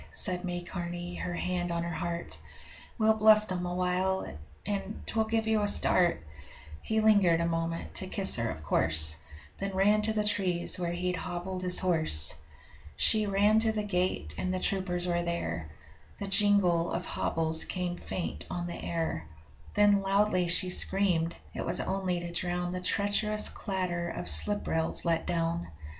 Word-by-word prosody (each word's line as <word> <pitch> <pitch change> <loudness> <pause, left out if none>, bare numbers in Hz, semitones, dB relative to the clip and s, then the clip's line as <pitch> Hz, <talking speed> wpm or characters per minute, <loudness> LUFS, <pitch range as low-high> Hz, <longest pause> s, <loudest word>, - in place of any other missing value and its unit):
said 180 -2 +3
May 175 -1 -4
Carney 175 0 -6
her 175 - -4
hand 175 0 -3
on 170 0 -2
her 170 0 -4
heart 170 0 -5 0.6
'We'll 220 -1 +2
bluff 215 0 +5
them 180 -1 -3
awhile, 180 +1 -1 0.4
and 205 +1 -4
'twill 220 -1 -1
give 225 0 -1
you 220 -1 +1
a 205 - 0
start.' 175 - +2 0.6
He 220 0 -1
lingered 200 -6 +4
a 170 - 0
moment 165 0 -3
to 190 - -4
kiss 190 0 +1
her, 115 -1 -1
of 80 -4 -7
course 80 0 +2 0.4
Then 195 -1 -4
ran 205 +3 +3
to 215 +1 +3
the 210 -1 0
trees 185 -5 +1
where 175 -1 -2
he'd 180 +1 -2
hobbled 180 +1 -5
his 180 0 +1
horse. 155 - +1 0.6
She 215 -1 +7
ran 205 +2 +3
to 225 0 +2
the 215 -1 -3
gate, 180 - -2
and 185 - -2
the 185 - -2
troopers 180 -2 -2
were 175 -1 0
there 85 - -4 0.5
The 200 - -5
jingle 195 -4 +4
of 175 0 -3
hobbles 160 0 +1
came 180 -1 -3
faint 175 0 -5
on 175 0 -4
the 175 - -7
air 160 - -3 0.5
Then 205 -1 +4
loudly 195 -2 +1
she 180 +2 +2
screamed: 180 -3 +2 0.2
it - - -4
was 175 +1 0
only 190 -2 -2
to 175 0 -6
drown 175 0 -3
The 180 0 -4
treacherous 210 +2 +1
clatter 180 -3 -3
of 90 - -6
slip 90 - +4
rails 160 +2 0
let 165 -1 0
down. 170 0 -2
180 Hz, 170 wpm, -29 LUFS, 170-200 Hz, 0.6 s, She